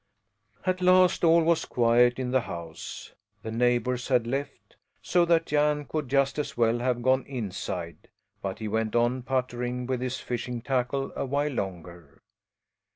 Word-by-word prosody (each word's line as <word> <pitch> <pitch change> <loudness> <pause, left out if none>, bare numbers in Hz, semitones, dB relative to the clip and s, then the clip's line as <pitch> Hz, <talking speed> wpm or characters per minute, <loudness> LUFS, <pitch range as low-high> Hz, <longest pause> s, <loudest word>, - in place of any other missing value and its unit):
At 185 0 0
last 185 0 +4
all 165 0 +5
was 165 0 +2
quiet 120 +1 +3
in 130 -1 -3
the 130 0 +3
house. 85 -5 -8 0.3
The 110 - -5
neighbours 120 +1 +1
had 125 -4 +2
left, 135 +3 -5 0.2
so 175 -1 +2
that 165 -1 +3
Jan 150 0 +1
could 150 -2 -4
just 140 +2 +2
as 150 - -4
well 115 0 +2
have 120 -1 -1
gone 130 +1 +3
inside; 95 -8 -5 0.3
but 95 -1 -4
he 110 - -5
went 110 +1 -1
on 120 +2 +2
puttering 125 -1 -2
with 130 -1 -2
his 130 0 -3
fishing 120 0 -4
tackle 135 +1 -1
a - - -2
while 145 +3 0
longer. 90 - -6
125 Hz, 160 wpm, -27 LUFS, 115-140 Hz, 0.3 s, all